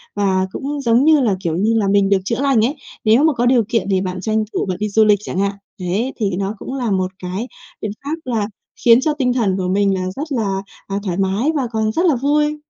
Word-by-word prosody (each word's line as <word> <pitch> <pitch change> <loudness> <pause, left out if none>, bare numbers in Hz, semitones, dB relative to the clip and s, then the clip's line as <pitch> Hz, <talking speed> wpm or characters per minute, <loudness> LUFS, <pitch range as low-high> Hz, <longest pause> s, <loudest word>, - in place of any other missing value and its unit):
Và 190 -2 +1
cũng 285 +5 -4
giống 240 +1 +3
như 310 -1 +6
là, 220 -8 +2
kiểu 165 -3 -1
như 215 +5 +2
là, 205 -3 +1
mình 200 0 +3
được 200 - +4
chữa 230 +4 -1
lành 270 -6 +3
ấy. 275 +6 -1 0.3
Nếu 225 +7 +5
mà 315 -2 +4
có 240 0 0
điều 245 -1 +4
kiện 215 -5 0
thì 190 -1 +2
bạn 185 -1 -4
tranh 220 +1 0
thủ - - -1
bạn 185 -2 -3
đi 210 0 -1
du 220 +2 +4
lịch 210 -1 +4
chẳng 185 - -4
hạn. 200 0 +1 0.3
Đấy, 180 -1 -4
thế 230 +9 0 0.2
thì 175 - -2
nó 195 +1 -2
cũng 260 - -6
là 245 -5 -2
một 185 -1 0
cái 190 +7 -4 0.3
biện 210 - -3
pháp 290 +3 -2
là 225 -5 -1 0.4
khiến 235 +1 +7
cho 305 +2 +1
tinh 260 -4 0
thần 205 -7 +1
của 185 -1 -2
mình 195 +1 +2
là 185 - -2
rất 295 +3 -4
là, 200 -7 -1 0.3
à, 195 - -3
thoải 180 -4 -2
mái 195 +9 +1
và 270 -4 0
còn 220 -1 0
rất 340 +11 0
là 320 -6 +4
vui. 295 +4 +1
220 Hz, 265 wpm, -19 LUFS, 195-260 Hz, 0.4 s, khiến